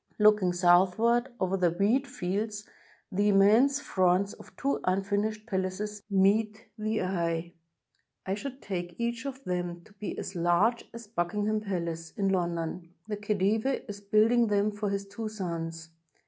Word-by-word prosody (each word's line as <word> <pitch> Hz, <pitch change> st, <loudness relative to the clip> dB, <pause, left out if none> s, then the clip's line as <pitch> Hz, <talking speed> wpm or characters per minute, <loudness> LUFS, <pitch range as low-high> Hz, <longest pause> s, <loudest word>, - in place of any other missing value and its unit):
Looking 210 Hz, -4 st, +5 dB
south 175 Hz, +1 st, +4 dB
ward 235 Hz, +2 st, +2 dB
over 185 Hz, 0 st, +1 dB
the 180 Hz, -2 st, +3 dB
wheat 210 Hz, +11 st, +1 dB
fields, 210 Hz, +4 st, -3 dB, 0.4 s
the 205 Hz, +2 st, +1 dB
immense 220 Hz, +8 st, +5 dB
fronts 185 Hz, +1 st, +1 dB
of -, -, -15 dB
two 280 Hz, 0 st, 0 dB
imfinished 205 Hz, +3 st, 0 dB
palaces 200 Hz, 0 st, -3 dB
meet 210 Hz, +3 st, +2 dB
the 215 Hz, -2 st, -1 dB
eye: 170 Hz, -2 st, -1 dB, 0.7 s
I 190 Hz, -, -1 dB
should 260 Hz, +6 st, -6 dB
take 175 Hz, -3 st, -4 dB
each 235 Hz, +3 st, -2 dB
of 270 Hz, 0 st, -7 dB
them 175 Hz, -1 st, -3 dB
to 210 Hz, -, -20 dB
be 205 Hz, 0 st, -6 dB
as -, -, -5 dB
large 175 Hz, +7 st, +2 dB
as 230 Hz, 0 st, -9 dB
Buckingham 210 Hz, +2 st, -1 dB
Palace, 170 Hz, -5 st, -4 dB
in 195 Hz, -1 st, +1 dB
London. 170 Hz, -1 st, -2 dB
The 210 Hz, -1 st, -3 dB
ELhedive 210 Hz, +5 st, 0 dB
is 205 Hz, -1 st, -7 dB
building 220 Hz, +4 st, +4 dB
them 205 Hz, 0 st, +2 dB
for 205 Hz, 0 st, -3 dB
his 200 Hz, 0 st, -2 dB
two 215 Hz, +2 st, -5 dB
sons. 165 Hz, -5 st, -5 dB
200 Hz, 150 wpm, -29 LUFS, 180-215 Hz, 0.7 s, Looking